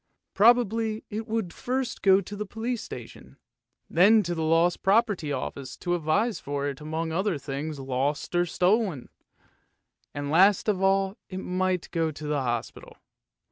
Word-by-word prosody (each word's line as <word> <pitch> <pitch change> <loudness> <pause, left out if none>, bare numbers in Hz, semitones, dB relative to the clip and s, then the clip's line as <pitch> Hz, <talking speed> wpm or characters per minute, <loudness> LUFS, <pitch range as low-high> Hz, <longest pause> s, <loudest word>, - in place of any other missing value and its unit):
Probably 225 -1 +3
it 220 +2 -4
would 220 -6 -2
first 255 0 -3
go 195 0 +5
to 200 +2 -8
the 210 0 -5
police 230 +3 -3
station, - - -10 0.5
then 205 +6 +5
to 175 -1 -2
the 165 - -3
lost 165 +2 +2
property 200 -6 +2
office 135 0 -5
to 175 - -2
advertise 185 +8 0
for 140 0 -3
it 140 0 -5
among 160 +2 -3
other 190 +1 0
things 145 +2 -5
lost 135 +4 -2
or 175 0 +2
stolen; 185 - +1 1.0
and 145 0 -4
last 190 +6 +4
of 200 -3 +1
all 195 +1 +2
it 185 - -6
might 185 -1 -1
go 165 -1 0
to 155 0 -8
the 150 -1 0
hospital. 120 -3 -4
180 Hz, 155 wpm, -26 LUFS, 155-210 Hz, 1.0 s, go